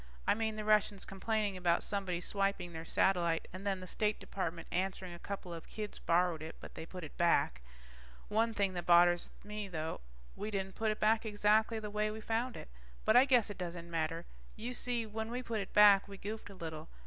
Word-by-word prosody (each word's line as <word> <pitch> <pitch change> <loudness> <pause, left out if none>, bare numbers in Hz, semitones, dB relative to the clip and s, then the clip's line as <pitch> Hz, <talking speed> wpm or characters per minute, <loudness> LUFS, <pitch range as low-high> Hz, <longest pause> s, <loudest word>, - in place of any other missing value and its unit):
I - - +4
mean, 220 0 -1
the 215 -1 -4
Russians 210 -2 +3
complaining 205 +1 -1
about 175 -2 +2
somebody 190 -4 -2
swiping 195 -2 -1
their 160 0 -5
satellite 170 -1 +2
and 190 +2 -6
then 190 -2 0
the - - -6
State 210 +3 0
Department 170 -3 -4
answering 185 0 -2
a 170 - -9
couple 190 -3 -6
of 165 - -8
kids 210 -1 -6
borrowed 170 -1 +2
it, 160 +1 -7
but - - -10
they 160 - -7
put 180 -1 -8
it 155 - -9
back. 170 - +3 0.7
One 225 +2 +2
thing 200 -3 0
that 175 -1 -4
bothers 175 0 +5
me 210 0 -5
though, 160 - -4 0.3
we 210 - -4
didn't 195 -2 -3
put 220 +2 0
it 215 - -1
back 220 +1 +3
exactly 215 +1 +2
the 210 -1 -5
way 210 0 0
we 215 +1 -5
found 230 +3 -1
it. - - -9 0.4
But 220 - +4
I 250 +2 +8
guess 245 -6 +4
it 200 - -9
doesn't 170 -1 -5
matter. 165 +1 -1 0.3
You 235 +3 -4
see, 240 -2 0
when 220 +1 -4
we 250 +2 -3
put 230 -2 -2
it 195 - -6
back, 205 -1 +7
we 200 -1 -9
goofed 215 +2 -6
a 200 - -10
little. 160 -3 -6
200 Hz, 215 wpm, -34 LUFS, 175-215 Hz, 0.7 s, I